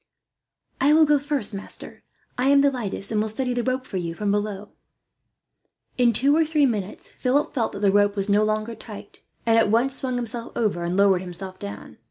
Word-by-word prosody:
"I 280 +3 +4
will 315 0 +6
go 295 -1 +3
first, 280 -7 -2
master. 195 - -6 0.3
I 250 +2 0
am 280 0 +5
the 280 0 +3
lightest, 210 -5 -3
and 215 -1 +1
will 220 - -1
steady 250 +3 -1
the 245 - -1
rope 255 +1 -2
for 195 - -5
you, 170 -2 -4
from 205 +2 -1
below." 205 -1 -3 1.3
In 245 -2 +3
two 275 +6 +4
or 325 - +4
three 305 -2 +2
minutes 210 -6 -3
Philip 275 +3 -1
felt 235 -5 -1
that - - -7
the 200 -2 +3
rope 205 0 +3
was 195 0 -1
no 205 +1 +3
longer 215 +1 -1
tight, 210 -3 -11 0.3
and 225 0 +4
at 225 - +2
once 250 +5 +1
swung 255 -2 -3
himself 235 -1 -3
over 205 -7 0
and 175 +2 -2
lowered 195 -2 +4
himself 185 +1 -6
down. 100 0 -9
220 Hz, 210 wpm, -23 LUFS, 200-260 Hz, 1.3 s, will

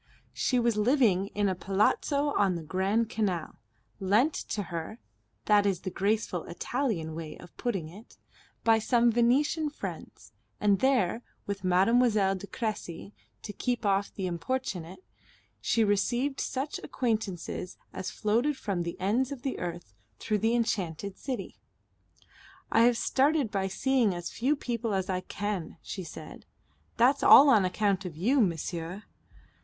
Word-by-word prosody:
She 255 - +1
was 235 -2 +1
living 210 -5 +3
in 205 0 +2
a 190 - +1
Palazzo 210 - +1
on 195 -3 +2
the 170 - -5
Grand 190 +7 0
Canal, 195 -7 -2 0.4
lent 215 +10 +3
to 205 - -3
her 170 +6 -4 0.5
that 205 -1 +4
is 190 -3 0
the 185 - -4
graceful 200 -3 -1
Italian 195 - -2
way 160 -1 -7
of 175 - -14
putting 195 -10 -2
it 200 +8 -14 0.5
by 225 -1 +5
some 235 +1 +3
Venetian 275 +7 +2
friends; 295 - -8 0.3
and 205 -2 +3
there, 245 -5 +2 0.2
with 200 -1 -4
Mademoiselle 195 +2 +3
de 195 +1 -7
Cressy 210 -4 -5 0.3
to 205 - -6
keep 245 +1 -2
off 200 0 +1
the 195 - -4
importunate, 185 -1 -4 0.6
she 230 - +2
received 240 +7 0
such 270 +3 -3
acquaintance 215 -8 -2
as 180 - -6 0.3
floated 240 +7 0
from 195 -7 -2
the 170 0 -5
ends 235 +8 +1
of 275 -3 -7
the 270 - -3
earth 175 - -6 0.2
through 210 -1 -1
the 225 +3 +2
enchanted 200 -5 -2
city. 265 -3 -5 1.1
"I 225 +1 +5
have 240 -1 +4
started 275 -2 +2
by 195 -1 0
seeing 230 0 +1
as 175 0 -5
few 270 +6 +1
people 235 -5 -2
as 190 0 -1
I 185 0 -1
can," 200 -5 -4
she 190 - -5
said. 155 -1 -10 0.5
"That's 255 +4 +4
all 285 +1 +9
on 215 -8 +5
account 200 +1 0
of 175 -5 -7
you, 245 - +3
monsieur." 175 +1 -2
205 Hz, 150 wpm, -29 LUFS, 185-240 Hz, 1.1 s, all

